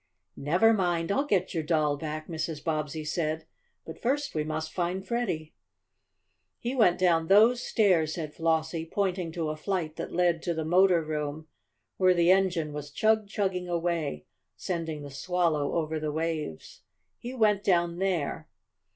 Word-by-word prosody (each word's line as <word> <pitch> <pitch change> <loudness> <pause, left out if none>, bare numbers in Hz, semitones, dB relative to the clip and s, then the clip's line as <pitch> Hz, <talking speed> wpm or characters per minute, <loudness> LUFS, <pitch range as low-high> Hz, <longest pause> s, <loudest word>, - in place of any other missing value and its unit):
"Never 180 +11 +3
mind! 175 -4 0
I'll 280 +7 +1
get 190 -7 +1
your 165 - 0
doll 155 -2 +1
back," 155 +1 -5
Mrs. 160 -2 -4
Bobbsey 155 -1 -2
said. 155 0 -2 0.4
"But - - -9
first 280 +3 0
we 155 - 0
must 155 0 -4
find 180 +2 -2
Freddie." 185 -10 -2 1.0
"He 240 +2 -3
went 200 -9 +4
down 165 -3 +3
those 225 +6 +5
stairs," 180 -11 +2
said 155 -3 -5
Flossie, 160 0 0
pointing 185 -2 -1
to 165 -2 -2
a - - -4
flight 160 -1 -3
that - - -5
led 175 -2 +2
to 170 -2 -2
the 160 -1 -2
motor 180 0 +4
room, 150 0 -4 0.5
where 185 -1 +4
the 170 +1 +4
engine 180 -5 +2
was 145 0 -6
chug 215 +6 +2
chugging 190 -3 -2
away, 170 - -2 0.3
sending 165 -4 -4
the 145 - -8
Swallow 160 -1 0
over 160 -1 -1
the 155 -1 -2
waves. 155 - -4 0.4
"He 245 +2 -7
went 210 -4 +3
down 175 -2 +1
there." 165 -4 -1
170 Hz, 160 wpm, -28 LUFS, 155-190 Hz, 1.0 s, those